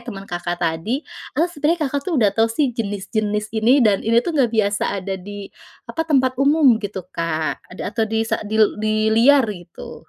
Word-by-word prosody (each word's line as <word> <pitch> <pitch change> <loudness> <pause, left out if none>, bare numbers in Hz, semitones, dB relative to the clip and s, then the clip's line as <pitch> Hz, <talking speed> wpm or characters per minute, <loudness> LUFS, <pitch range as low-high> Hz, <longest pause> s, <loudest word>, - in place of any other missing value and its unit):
temen 195 -3 -7
Kakak 175 -1 -4
tadi, 185 - -2 0.3
atau 320 - +3
sebenarnya 315 +2 0
Kakak 285 0 -1
tuh, 335 - 0
udah 210 -5 +4
tahu 225 0 +2
sih, 255 +3 0
jenis-jenis 210 -1 -3
ini, 250 +4 +4
dan 205 -3 +3
ini 230 +1 +1
tuh 345 - -2
nggak 270 -6 +2
biasa 205 -2 0
ada 190 0 -4
di, 205 +2 -8 0.4
apa, - - -5
tempat 260 -3 +2
umum, 275 -5 +4
gitu 195 -3 -5
Kak, 160 -2 -2
ada 185 +3 -6
atau 225 -2 0
di 225 +1 0
sa - - -2
di 215 +1 -4
l 215 -1 +3
di 215 0 +1
liar, 265 +4 +5
gitu? 175 -3 -12
220 Hz, 195 wpm, -20 LUFS, 200-260 Hz, 0.4 s, liar